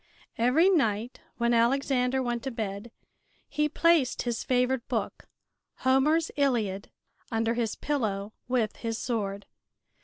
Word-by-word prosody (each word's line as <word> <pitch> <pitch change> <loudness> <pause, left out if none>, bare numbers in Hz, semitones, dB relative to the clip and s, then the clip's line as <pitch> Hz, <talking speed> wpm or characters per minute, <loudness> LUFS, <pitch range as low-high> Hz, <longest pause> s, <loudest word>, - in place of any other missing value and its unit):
Every 255 +10 +4
night 240 - +1 0.2
when 235 0 +2
Alexander 255 +2 +2
went 240 -1 -2
to - - -1
bed 215 -2 -5 0.6
he 300 +1 0
placed 325 -4 +2
his 240 -2 -2
favorite 250 -1 +1
book, - - -3 0.5
Homer's 295 +5 +3
"Iliad," 225 -9 0 0.4
under 225 0 +1
his 230 -2 -1
pillow 215 -8 -2
with 240 -4 0
his 225 -1 -3
sword. 205 -5 -3
240 Hz, 120 wpm, -28 LUFS, 225-270 Hz, 0.6 s, Every